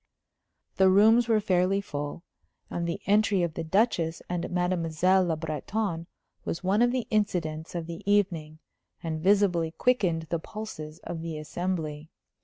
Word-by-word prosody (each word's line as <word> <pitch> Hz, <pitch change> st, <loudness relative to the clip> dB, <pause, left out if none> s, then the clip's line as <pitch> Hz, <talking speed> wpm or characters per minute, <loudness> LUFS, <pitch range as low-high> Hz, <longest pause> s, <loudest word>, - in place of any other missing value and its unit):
The 190 Hz, 0 st, +6 dB
rooms 220 Hz, +5 st, +5 dB
were 225 Hz, -2 st, +4 dB
fairly 190 Hz, -1 st, +2 dB
full; 145 Hz, -3 st, -5 dB, 0.5 s
and 170 Hz, 0 st, -2 dB
the 170 Hz, -, -2 dB
entry 205 Hz, -2 st, +3 dB
of 170 Hz, -2 st, -1 dB
the 165 Hz, -, -4 dB
Duchess 170 Hz, -2 st, +1 dB
and 175 Hz, -1 st, -3 dB
Mademoiselle 180 Hz, +1 st, +2 dB
Le 165 Hz, -2 st, 0 dB
Breton 165 Hz, +3 st, -3 dB, 0.4 s
was 165 Hz, -, -4 dB
one 195 Hz, +4 st, +2 dB
of 240 Hz, 0 st, +4 dB
the 250 Hz, -2 st, -1 dB
incidents 170 Hz, -7 st, -1 dB
of 170 Hz, -1 st, -3 dB
the 170 Hz, +2 st, -7 dB
evening, 170 Hz, -7 st, +1 dB, 0.5 s
and 160 Hz, -1 st, -3 dB
visibly 185 Hz, -3 st, +3 dB
quickened 185 Hz, -10 st, +2 dB
the 170 Hz, -, +1 dB
pulses 160 Hz, -6 st, -7 dB
of 165 Hz, -2 st, -5 dB
the 165 Hz, -1 st, -4 dB
assembly. 155 Hz, -1 st, -4 dB
175 Hz, 150 wpm, -27 LUFS, 160-200 Hz, 0.5 s, The